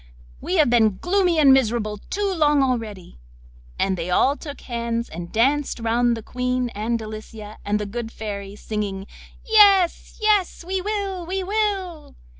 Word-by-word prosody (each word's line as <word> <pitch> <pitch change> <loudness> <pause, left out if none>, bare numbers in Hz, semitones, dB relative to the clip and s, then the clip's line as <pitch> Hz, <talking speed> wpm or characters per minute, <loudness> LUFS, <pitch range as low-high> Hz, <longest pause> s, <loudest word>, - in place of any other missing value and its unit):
we 365 - -2
have 310 -4 +5
been 220 -5 +3
gloomy 360 - +1
and 280 -3 +7
miserable 225 -5 +1
too 400 -1 -1
long 295 -3 +3
already.' 220 - -3 0.6
And 190 -1 +1
they 170 0 -4
all 265 +10 +3
took 290 -2 -9
hands 235 -1 -3
and 170 +1 -8
danced 270 +5 +1
round 235 +1 +1
the 225 - -8
Queen, 250 +1 -2
and 225 +2 -2
Delicia, 215 -1 -9
and 205 +1 0
the 210 - -3
good 225 +2 -5
Fairy, 200 -3 -6
singing: 205 -2 -4 0.4
'Yes, 400 -5 +4
yes; 415 -5 +1
we 375 +1 -2
will, 395 -2 -3
we 380 +1 -2
will! 385 -5 -2
245 Hz, 155 wpm, -22 LUFS, 215-360 Hz, 0.6 s, and